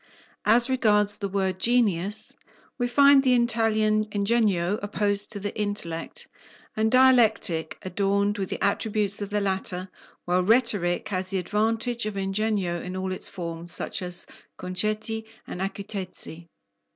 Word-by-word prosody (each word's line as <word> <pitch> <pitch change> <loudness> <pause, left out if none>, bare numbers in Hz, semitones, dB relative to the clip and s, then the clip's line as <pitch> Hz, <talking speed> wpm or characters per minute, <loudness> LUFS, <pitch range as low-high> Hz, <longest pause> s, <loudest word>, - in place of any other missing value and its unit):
As 235 +3 +5
regards 210 -5 +2
the 200 - -4
word 190 -1 -1
"genius," 210 -4 +1 0.5
we 245 - +1
find 280 +2 +6
the 255 -2 +3
Italian 220 -2 +2
"ingegno" 205 -3 +1
opposed 205 0 +1
to 205 - -5
the 205 +1 -5
intellect, 205 - -3 0.5
and 220 0 +1
Dialectic 220 -10 +3
adorned 200 +2 0
with 190 - -2
the - - -3
attributes 205 0 0
of 200 - -4
the 210 0 0
latter, 190 -1 -3 0.4
while 180 +1 +2
Rhetoric 210 -3 +2
has 185 -2 -2
the 195 - -1
advantage 225 +4 -1
of 210 - -5
"ingegno" 195 -3 -1
in 180 +1 -5
all 185 0 -3
its 185 - -3
forms, 170 -2 -6
such - - -3
as 180 -1 -2 0.3
"concetti" 215 +4 -2 0.2
and 180 - -7
"acutezze." 190 -4 -5
205 Hz, 140 wpm, -25 LUFS, 185-220 Hz, 0.5 s, find